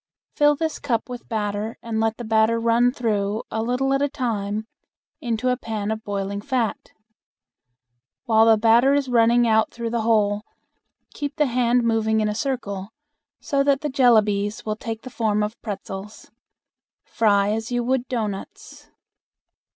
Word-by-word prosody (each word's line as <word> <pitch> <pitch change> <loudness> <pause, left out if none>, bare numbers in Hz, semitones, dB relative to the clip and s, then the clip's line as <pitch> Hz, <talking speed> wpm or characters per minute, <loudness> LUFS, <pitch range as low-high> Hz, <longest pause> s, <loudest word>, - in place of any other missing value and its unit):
Fill 295 -1 +4
this 320 +1 -3
cup 235 -6 -1
with 245 -1 -9
batter 210 0 -3
and 225 -1 -3
let 225 0 0
the 240 - -6
batter 220 +1 +2
run 235 +2 +3
through 215 -3 -1
a 220 - -1
little 250 +4 0
at 275 - +1
a 285 - +1
time 220 -6 -3 0.5
into 240 +1 -1
a 250 - +2
pan 220 -4 -4
of 220 0 -4
boiling 200 -1 -3
fat. 245 -2 -2 1.4
While 225 -2 +4
the 225 -1 +6
batter 235 +5 +4
is 280 -2 0
running 235 0 +4
out 220 -1 +3
through 235 -1 -5
the 235 -1 0
hole 210 -2 +2 0.7
keep 285 -1 -4
the 300 - +2
hand 245 -1 +2
moving 220 -1 +1
in 215 - +1
a 210 - -1
circle, 210 -5 -3 0.5
so 280 -2 +1
that 280 -1 +2
the 300 - -2
jellabies 215 -5 +2
will 215 -1 -1
take 225 0 -6
the 255 - -9
form 210 -2 0
of 215 +2 -5
pretzels. 200 -1 -7 0.7
Fry 205 -2 +2
as 225 +2 -3
you 245 0 0
would 255 0 0
doughnuts. 215 -6 -6
225 Hz, 160 wpm, -23 LUFS, 215-245 Hz, 1.4 s, the